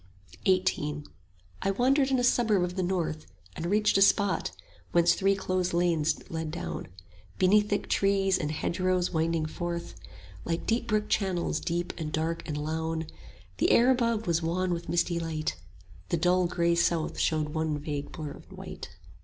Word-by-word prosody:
XVIII 170 -6 +1 0.6
I - - 0
wandered 265 +7 +3
in 265 - +2
a 245 - +1
suburb 220 -6 +3
of 180 0 -3
the 190 - -1
north, 170 - -2 0.3
And 170 - -3
reached 210 +1 +3
a - - +2
spot 200 0 +3 0.4
whence 170 0 +5
three 195 +1 +2
close 185 -2 -1
lanes 165 -3 +2
led 160 -1 -4
down, 170 +3 -5 0.5
Beneath 205 +3 +4
thick 205 - -1
trees 195 -1 +2
and 150 - -2
hedgerows 180 +3 0
winding 165 -1 0
forth 170 +2 -4 0.5
Like 165 0 -2
deep 235 +1 0
brook 215 -1 +1
channels, 180 -7 0
deep 175 +1 -2
and 155 -2 -3
dark 165 +2 -1
and 150 - -3
lown: 160 +2 -2 0.5
The - - +2
air 245 +2 +6
above 235 -3 +1
was 170 -2 +1
wan 175 +2 0
with 170 0 -5
misty 170 0 +1
light, 160 -2 -2 0.5
5 - - -31
The 170 - +1
dull 180 +2 +3
grey 170 -1 +1
south 170 -1 +1
showed 155 -2 +1
one 160 -1 -1
vague 145 -1 -4
blur 155 -4 -6
of - - -13
white. - - -8
175 Hz, 170 wpm, -28 LUFS, 160-195 Hz, 0.6 s, air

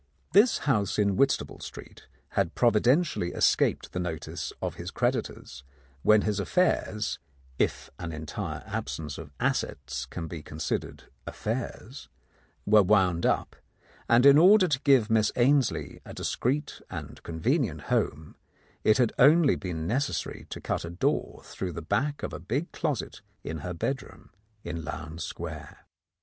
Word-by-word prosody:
This 215 +5 +6
house 105 -9 +1
in 100 -2 +2
Whitstaple 135 +6 +1
Street - - -10 0.2
had 95 -4 -1
providentially 120 - +2
escaped - - +2
the 90 - -2
notice 85 -3 -4
of - - -3
his - - -7
creditors 65 -1 -2 0.4
when 105 +6 +5
his 105 -1 0
affairs 110 - 0 0.2
— 65 -1 -29
if - - -14
an 85 -1 -4
entire 75 -1 -5
absence 75 -2 -4
of 80 -3 -9
assets 65 -3 -2
can 80 +5 -6
be 80 -1 -7
considered 75 +1 -4 0.2
affairs 120 +3 -5 0.3
— - - -37
were 105 0 +6
wound 95 -4 +3
up, - - 0 0.5
and 120 +2 +5
in 140 +1 +9
order 190 +2 +7
to 135 -5 0
give 130 -6 +4
Miss 110 -1 +3
Ainslie 120 - +2
a - - -10
discreet 140 +5 -2
and - - -7
convenient 85 - -1
home, 75 +2 -1 0.5
it 110 - +5
had 125 -3 +2
only 150 +3 +6
been 85 -4 -4
necessary 110 - -2
to - - -6
cut - - -2
a 85 - -5
door 85 - -1
through 90 -2 -5
the 80 - -5
back 145 - -1
of - - -3
a - - -5
big 125 - -3
closet 150 -8 -3 0.2
in 80 0 -4
her 90 +4 -5
bedroom 135 +10 -4 0.3
in 85 -1 -5
Lowndes 80 +1 -6
Square. - - -7
105 Hz, 150 wpm, -28 LUFS, 80-135 Hz, 0.5 s, in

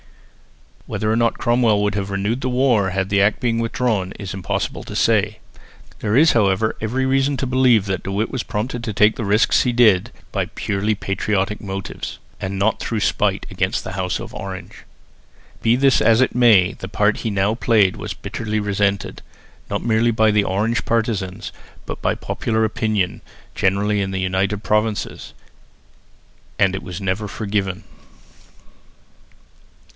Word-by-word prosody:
Whether 110 0 -1
or - - +2
no 115 0 +3
Cromwell 115 -4 +1
would 105 0 0
have 100 -1 -3
renewed 100 +6 -1
the 130 - -1
war, 125 -6 +2
had 95 +1 -2
the 100 -1 +3
Act 105 +2 +2
been 115 -2 0
withdrawn, 115 -5 -1
it - - -12
is 95 - -5
impossible 95 -3 -3
to - - -8
say. 110 -1 +2 0.6
There 105 +3 +1
is, 160 +2 +6
however, 105 0 +2
every 125 +5 -1
reason 135 +1 +1
to 130 - -2
believe 125 -5 +3
that 95 -2 -2
De 95 - -5
Witt 105 +3 -1
was 130 - -2
prompted 115 +2 -4
to 115 - -3
take 105 +2 +4
the - - -4
risks 105 +2 +3
he 125 - +1
did 110 -6 +4 0.2
by - - -1
purely 105 +1 -1
patriotic 100 0 -1
motives, 95 -1 -6 0.2
and 95 0 -3
not 105 +3 +1
through 115 -3 -2
spite - - 0
against - - -1
the - - -6
house 90 -1 -2
of - - -8
Orange. 95 -2 -8 0.8
Be 115 +1 +3
this 135 0 +3
as 115 0 +4
it 130 - +2
may, 110 -7 +5
the 95 - -8
part 105 0 +2
that - - -7
he 115 - -2
now 100 +1 +1
played 110 -5 +3
was - - -6
bitterly 110 -1 -3
resented, 100 -1 -1 0.5
not - - -2
merely 115 +1 +3
by 110 -1 +3
the 105 -1 +3
Orange 105 +5 0
partisans, 105 -4 -2 0.3
but - - -6
by - - +1
popular 110 -1 -1
opinion 110 -4 -1 0.3
generally 100 +2 +1
in 95 - -2
the 95 0 -3
United 95 +3 -1
Provinces, 105 0 -1 1.2
and 95 -1 +3
it 95 - -4
was 90 +1 -6
never 95 +2 -2
forgiven. 100 -2 -3
105 Hz, 170 wpm, -20 LUFS, 95-115 Hz, 1.2 s, is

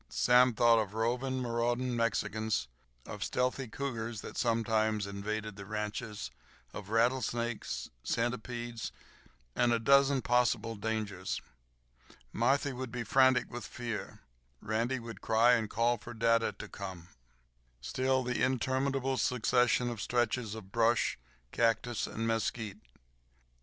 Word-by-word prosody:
Sam 125 -1 +4
thought 115 0 +5
of 105 -1 -3
roving, 125 +3 0
marauding 120 +1 0
Mexicans, 110 - 0 0.4
of - - -5
stealthy 125 +1 -1
cougars 115 -3 -4
that - - -8
sometimes 110 -3 +1
invaded 105 +1 -4
the 100 - -8
ranches, 105 - -4 0.4
of 100 -1 -8
rattlesnakes, 120 0 0
centipedes, 120 0 -2 0.6
and 120 -1 +3
a 115 - +4
dozen 140 +3 +4
possible 120 -2 +2
dangers. 105 -3 -3 0.9
Marthy 135 +4 +2
would 130 -1 -5
be 120 0 -3
frantic 130 0 +4
with 120 -1 -5
fear. 120 -3 -5 0.4
Randy 115 +4 -1
would 115 -1 -8
cry, 115 +2 +4
and 110 -3 +1
call 115 +2 +1
for 120 +2 -9
dada 115 0 +3
to - - -8
come. 95 -3 -8 0.7
Still 130 - 0
the 125 0 -2
interminable 130 +1 +1
succession 125 0 +2
of 115 -3 -5
stretches 120 -1 0
of 100 -4 -10
brush, 115 - +2 0.3
cactus, 115 0 +1
and 115 - -3
mesquite. 110 -2 -1
115 Hz, 120 wpm, -32 LUFS, 110-125 Hz, 0.9 s, thought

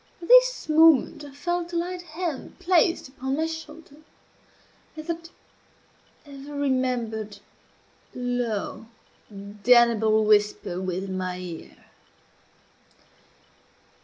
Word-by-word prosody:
At 340 - -9
this - - +5
moment 315 -3 +4
I 290 - -9
felt 345 +4 -3
a - - -3
light 355 +1 -2
hand 335 -3 -6
placed 360 -3 +2
upon 265 +1 -4
my 320 - 0
shoulder, 320 -2 -9 1.0
and 310 - -7
that 335 0 -5 1.0
ever 285 0 -10
remembered, 245 -6 -2 0.8
low, 245 -3 -3 0.4
damnable 215 +2 +3
whisper 205 -3 +1
within 190 +1 -4
my 185 -1 -3
ear. 175 -3 -9
265 Hz, 95 wpm, -25 LUFS, 215-325 Hz, 1.0 s, this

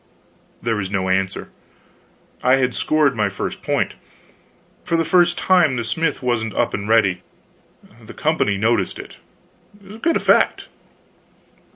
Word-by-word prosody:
There 115 -2 0
was 95 -2 -3
no 95 -2 -1
answer. 95 0 -1 0.9
I 130 +1 +4
had 130 -2 0
scored 150 -4 +1
my 105 -2 0
first 100 - -5
point! - - -1 0.9
For 165 - 0
the 165 - 0
first 175 0 +3
time, 175 -8 +3
the 120 - -2
smith 145 +5 -2
wasn't 115 -3 -1
up - - 0
and 100 +1 -4
ready. 100 -6 +3 0.8
The - - -12
company 100 -1 0
noticed 110 +4 0
it. - - -11 0.8
Good 335 0 +1
effect. - - +2
115 Hz, 135 wpm, -20 LUFS, 100-155 Hz, 0.9 s, I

